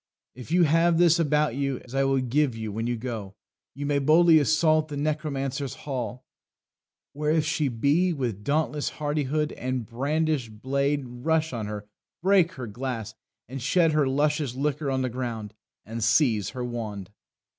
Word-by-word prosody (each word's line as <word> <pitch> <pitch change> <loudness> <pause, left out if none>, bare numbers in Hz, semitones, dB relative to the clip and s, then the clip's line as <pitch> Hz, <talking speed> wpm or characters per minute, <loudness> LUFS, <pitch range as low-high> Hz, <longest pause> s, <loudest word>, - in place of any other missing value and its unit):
If 125 +1 -11
you 175 +1 +5
have 165 +2 +3
this 170 -1 +5
about 150 -3 +2
you 140 -1 -1
(As 125 - -13
I 135 0 +2
will 135 0 +2
give 130 0 +1
you 110 -1 -5
when 115 +3 -3
you 120 -1 -1
go) 110 -5 -6 0.4
you 145 +1 -4
may 145 0 +1
Boldly 160 +3 +6
assault 155 +1 +3
the 145 -2 -6
necromancer's 140 -3 -2
hall: 130 -3 -4 0.9
Where 150 +1 -2
if 155 0 +2
she 150 -1 0
be, 140 +9 +2
with 120 - -3
dauntless 150 +2 0
hardihood, 150 0 -1
And 130 -2 -3
brandished 135 -2 -1
blade, 140 +3 0
rush 155 +6 -1
on 110 -3 -3
her, 105 -1 -6 0.4
break 185 -2 +4
her 130 - -6
glass, 115 -1 -5 0.3
And 130 +2 -6
shed 165 +6 +3
her 150 -3 +2
luscious 145 -1 0
liquor 145 +1 -1
on 130 -1 0
the - - 0
ground, 115 -4 -5 0.3
And 115 +1 -4
seize 115 -3 +3
her 125 -1 -5
wand." 110 -5 -5
140 Hz, 165 wpm, -26 LUFS, 120-155 Hz, 0.9 s, Boldly